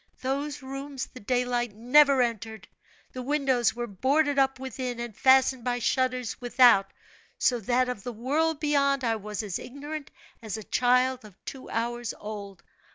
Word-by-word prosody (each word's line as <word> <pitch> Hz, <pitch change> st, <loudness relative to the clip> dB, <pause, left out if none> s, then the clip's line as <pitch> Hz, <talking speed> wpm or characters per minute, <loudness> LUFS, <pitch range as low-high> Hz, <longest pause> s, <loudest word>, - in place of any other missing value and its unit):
Those 280 Hz, +2 st, -2 dB
rooms 275 Hz, 0 st, -5 dB
the 255 Hz, -, -13 dB
daylight 245 Hz, -1 st, -1 dB
never 265 Hz, +3 st, +5 dB
entered, 225 Hz, -2 st, -4 dB, 0.5 s
the 255 Hz, -, -5 dB
windows 265 Hz, -4 st, +1 dB
were 240 Hz, 0 st, -3 dB
boarded 275 Hz, +7 st, +1 dB
up 270 Hz, -1 st, +2 dB
within, 255 Hz, -2 st, -5 dB
and 235 Hz, -3 st, -6 dB
fastened 260 Hz, -1 st, +4 dB
by 245 Hz, 0 st, 0 dB
shutters 255 Hz, -1 st, -1 dB
without, 245 Hz, -5 st, +5 dB, 0.5 s
so 245 Hz, -2 st, +2 dB
that 250 Hz, +4 st, +1 dB
of 250 Hz, -5 st, -4 dB
the 245 Hz, -, -5 dB
world 290 Hz, +7 st, 0 dB
beyond 280 Hz, -3 st, +2 dB
I 230 Hz, -2 st, +1 dB
was 210 Hz, 0 st, -5 dB
as 200 Hz, -4 st, -3 dB
ignorant 290 Hz, +3 st, -7 dB, 0.3 s
as 220 Hz, -1 st, -5 dB
a 220 Hz, -, -7 dB
child 250 Hz, +3 st, +2 dB
of 210 Hz, -4 st, -14 dB
two 265 Hz, -, -8 dB
hours 240 Hz, 0 st, -2 dB
old. 200 Hz, -4 st, -8 dB
250 Hz, 160 wpm, -27 LUFS, 230-270 Hz, 0.5 s, never